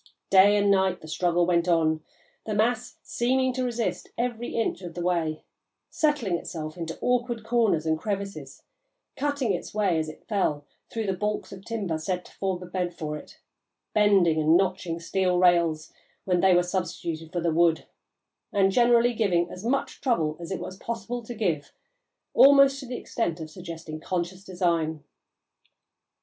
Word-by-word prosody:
Day 200 +2 +7
and 200 0 +3
night 190 -2 +2
the 155 - -11
struggle 175 +2 +1
went 170 0 +2
on, 160 -2 +2 0.4
the 215 - -1
mass 230 +3 0
seeming 260 +2 +1
to 255 0 -2
resist 240 -2 -2
every 240 -1 -2
inch 225 -4 -1
of 175 -3 -8
the 175 - -3
way, 165 -3 -1 0.5
settling 290 - +1
itself 155 -3 -6
into 165 -2 -5
awkward 240 -2 0
corners 225 -8 +2
and 160 0 +1
crevices; 200 0 -5 0.5
cutting 285 -6 0
its 180 - -5
way, 195 -6 +2
as 155 0 -2
it 155 - -13
fell, 170 -9 0 0.2
through 225 -1 -3
the 195 - 0
baulks 210 +3 -3
of 190 -1 -10
timber 195 -9 -3
set 180 +2 -3
to - - -15
form 190 -2 -3
a - - -7
bed 180 -1 -3
for 150 -2 -4
it; 150 - -11 0.5
bending 195 -7 +4
and 160 +2 +5
notching 185 -3 -1
steel 180 +2 0
rails, 170 -3 +3 0.3
when 180 -2 +2
they 185 0 +5
were 175 - +4
substituted 170 -3 -4
for 180 - -2
the 170 -1 0
wood; 165 0 +3 0.7
and 195 -1 +3
generally 240 +2 +4
giving 180 -6 +1
as 185 - -8
much 260 +4 -1
trouble 165 - +1
as 170 - -7
it 190 - -3
was 185 - -7
possible 235 +2 -4
to 235 +1 -8
give, 165 -10 -1 0.6
almost 275 0 +7
to 265 - -8
the 245 - -4
extent 175 -8 -2
of 155 -1 -7
suggesting 165 -3 -8
conscious 180 +2 -3
design. 170 -5 -1
185 Hz, 170 wpm, -26 LUFS, 170-225 Hz, 0.7 s, Day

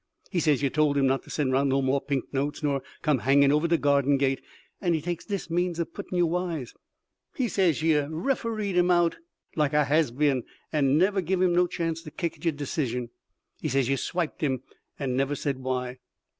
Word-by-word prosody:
He 180 - +1
says 150 -4 +2
yer 140 - +3
told 150 0 +2
him 140 - +3
not 135 0 +2
to - - -15
send 140 -4 0
'round 135 +1 +2
no 135 +1 +2
more 135 +1 +1
pink 140 -1 -3
notes 140 +3 -2
nor 140 -2 +1 0.2
come 150 -5 +2
hangin' 140 +3 +4
over 150 +3 +2
de 170 0 +3
garden 140 -1 +3
gate, 135 -1 +1 0.4
and 175 -3 +2
he - - 0
takes 175 +1 -4
dis 200 -3 -3
means 175 0 0
of 170 - -3
puttin' 180 - -5
yer 175 - +4
wise. 170 -6 -2 0.6
He 260 -5 0
says 180 -8 +1
yer 150 -3 +3
refereed 215 +3 -1
him 180 0 +3
out 175 -1 +3 0.4
like 150 -2 +1
a 150 0 +4
has 155 +1 +3
been, 135 0 +1 0.3
and 140 -2 +3
never 195 +3 +3
give 185 +1 -1
him 180 -1 +3
no 180 +1 +4
chance 165 -2 -3
to 160 - -9
kick 165 +2 -3
at - - -22
de 170 - +1
decision. 130 -5 -3 0.5
He - - -2
says 135 -2 +1
yer 135 - +3
swiped 170 +3 -3
him, 135 -4 0 0.3
and 130 -3 -2
never 135 +2 0
said 140 -1 -2
why." 130 -1 -3
150 Hz, 215 wpm, -27 LUFS, 135-175 Hz, 0.6 s, hangin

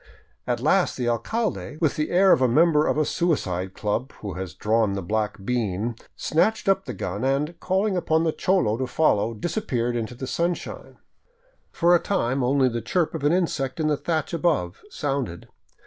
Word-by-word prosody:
At - - 0
last - - +2
the 125 - -1
alcalde, 175 - -2
with 160 -4 +1
the 150 - -1
air 190 +2 +5
of - - +5
a 130 - +5
member 155 +4 +4
of - - +1
a 155 - +2
suicide 95 - -1
club 110 +6 -2
who 100 -3 -7
has 90 0 -6
drawn 110 -1 +1
the 100 -1 -3
black 105 0 -2
bean, 115 -2 -1 0.2
snatched 215 +7 +1
up 195 0 +2
the 125 - -5
gun 95 +3 -4
and, 140 +5 0
calling 190 +2 0
upon 160 -2 +1
the 165 - +2
cholo 165 - +1
to 130 - -1
follow, 115 -6 +1
disappeared 125 - -2
into 115 +1 -3
the 130 - -5
sunshine. 170 +6 -3 0.7
For 170 +1 +3
a 175 - +6
time 135 -10 0
only 130 +1 +3
the 120 -1 -2
chirp 165 - 0
of 160 -3 -5
an 145 - +3
insect 165 -6 -1
in 155 -1 +1
the 150 - +2
thatch 160 +1 -2
above 150 - 0
sounded. 135 - -3
135 Hz, 185 wpm, -24 LUFS, 115-170 Hz, 0.7 s, a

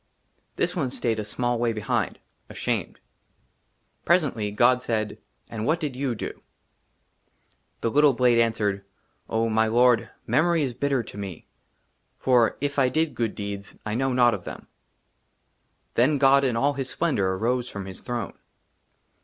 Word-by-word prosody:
THIS 175 +2 0
ONE 145 -7 0
STAYED 115 -3 -1
A - - -2
SMALL 120 +3 -1
WAY 120 -1 +1
BEHIND, 105 -2 -1 0.3
ASHAMED. - - -3 1.0
PRESENTLY, 145 - +2
GOD 120 +4 +3
SAID, 110 -4 -2
" - - -45
AND 110 -1 -3
WHAT 160 +3 +2
DID 145 -5 -3
YOU 130 -2 -1
DO? - - -6 0.7
" - - -36
THE 115 - 0
LITTLE 145 +1 +5
BLADE 120 -1 +3
ANSWERED, 105 -4 +1 0.2
" - - -42
OH, 115 +1 +1
MY 110 0 +2
tORD, 120 +1 +3
" - - -41
MEMORY 165 0 +2
IS 130 -3 -2
BITTER 135 0 0
TO 105 - -10
ME, 95 -3 -5
^ - - -21 0.4
" - - -46
FOR, 125 -3 +3
IF 145 0 -1
I 130 -2 +4
DID 160 +2 0
GOOD 115 -3 -2
DEEDS, 100 -1 -6
" - - -39
I 105 - -2
KNOW 135 +3 0
NOT 120 -1 +4
OF 100 -4 -5
THEM.*' - - -9 1.3
THEN 145 +5 +3
GOD, 140 0 +5
IN 120 -3 0
ALL 140 +4 +2
HIS 135 -2 -4
SPLENDOR, 100 - 0
AROSE 125 +5 -1
FROM 100 -4 -6
HIS 95 -1 -8
THRONE. 120 -2 -4
120 Hz, 175 wpm, -25 LUFS, 110-135 Hz, 1.3 s, LITTLE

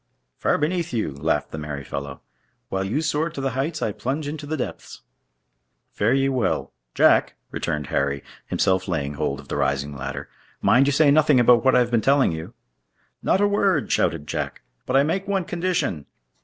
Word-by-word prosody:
"Far - - +2
beneath 165 +1 -1
you," 110 -10 -1
laughed 75 +2 -1
the 80 - -5
merry 75 -2 -5
fellow. 70 +1 -6 0.5
"While 95 0 -1
you 115 +11 -1
soar 155 +1 0
to 150 - -8
the 135 -1 -1
heights, 150 +4 -2
I 110 - 0
plunge 140 +8 -3
into 150 0 -6
the 155 +1 -2
depths." 130 - -6 0.9
"Fare 110 +5 +1
ye 135 0 +2
well. 125 -7 -1 0.2
Jack!" - - +4 0.2
returned 75 -3 -2
Harry, 70 0 0 0.2
himself 95 0 +1
laying 75 -6 -2
hold 70 -1 -2
of 70 - -12
the - - -3
rising 70 0 -1
ladder; 70 +1 -5 0.3
"mind 135 +3 +4
you - - +3
say 145 +1 +4
nothing 150 -2 +5
about 120 -1 +5
what 130 - +4
I - - +6
have 120 0 -1
been 115 -2 +3
telling 135 -1 +3
you." 80 0 -7 0.7
"Not 190 - +2
a 205 - +4
word," 200 -1 +1
shouted 75 - +1
Jack, - - -4 0.2
"but 130 - 0
I 135 - +6
make 190 +6 -1
one 195 -2 0
condition." 170 - -2
125 Hz, 190 wpm, -23 LUFS, -, 0.9 s, I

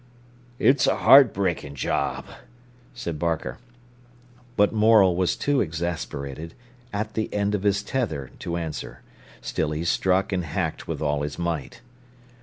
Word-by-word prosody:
"It's 135 +2 +4
a - - +3
heart 135 -5 +7
breaking 85 -7 -2
job," 65 - -1 0.7
said 85 -10 -5
Barker. 85 +3 -2 1.0
But 105 +1 +4
Morel 105 -4 +5
was 90 0 +1
too 145 -2 +1
exasperated, 80 -3 -4 0.4
at 110 +1 -3
the 110 - -2
end 105 0 0
of 105 - 0
his 100 0 +1
tether, 105 - -3
to 85 0 -3
answer. 80 -3 -6 0.4
Still 80 - -2
he 75 +2 -3
struck 95 +3 +1
and 90 -1 0
hacked 80 - -3
with - - -3
all 75 -1 0
his 75 0 -4
might. 85 -5 -3
90 Hz, 140 wpm, -25 LUFS, 80-105 Hz, 1.0 s, heart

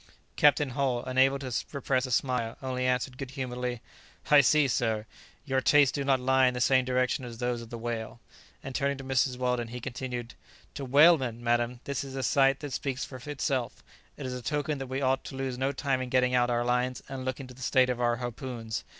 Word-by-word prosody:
Captain 145 -1 +4
Hull, 125 -2 0
unable 130 +2 +3
to 130 -3 -6 0.2
repress 135 -2 0
a - - -7
smile, 120 -2 0
only 130 -1 -1
answered 125 +1 -1
good 135 -2 -5
humouredly, 125 -3 -4 0.5
"I 145 -1 +9
see, 150 +2 +4
sir, 110 -4 0 0.4
your 135 -2 +1
tastes 145 -1 +5
do 140 - -2
not 135 -1 +2
lie 130 +1 +3
in 125 - 0
the - - -2
same 130 +1 +3
direction 130 +1 0
as 120 -2 -8
those 120 0 -2
of 115 - -10
the 120 - -6
whale." 115 0 -5 0.4
And 135 - -6
turning 140 +1 0
to 135 - -8
Mrs. 130 -1 +1
Weldon, 125 -2 -1
he 125 +2 -7
continued, 125 -1 -5 0.4
"To 140 - -5
whalemen, 135 -4 +4
madam, 120 +1 0
this 140 -1 -3
is 135 -1 -8
a 135 - -3
sight 135 +2 +3
that 145 -3 -6
speaks 135 -1 -2
for 130 - -9
itself. 130 -3 -2 0.3
It 145 - -6
is 130 - -3
a 125 - -5
token 145 +2 -2
that 135 - -5
we 130 +2 -3
ought 130 0 +1
to - - -7
lose 135 -1 -3
no 135 +1 +1
time 135 -1 -1
in 130 - -4
getting 125 0 +2
out 125 -1 +3
our 120 0 0
lines 125 +1 0
and 135 -1 -6
looking 130 +1 -4
to 125 - -12
the 130 - -15
state 130 0 +3
of 125 -1 -3
our 120 -1 +2
harpoons. 120 -2 -5
130 Hz, 220 wpm, -28 LUFS, 125-135 Hz, 0.5 s, I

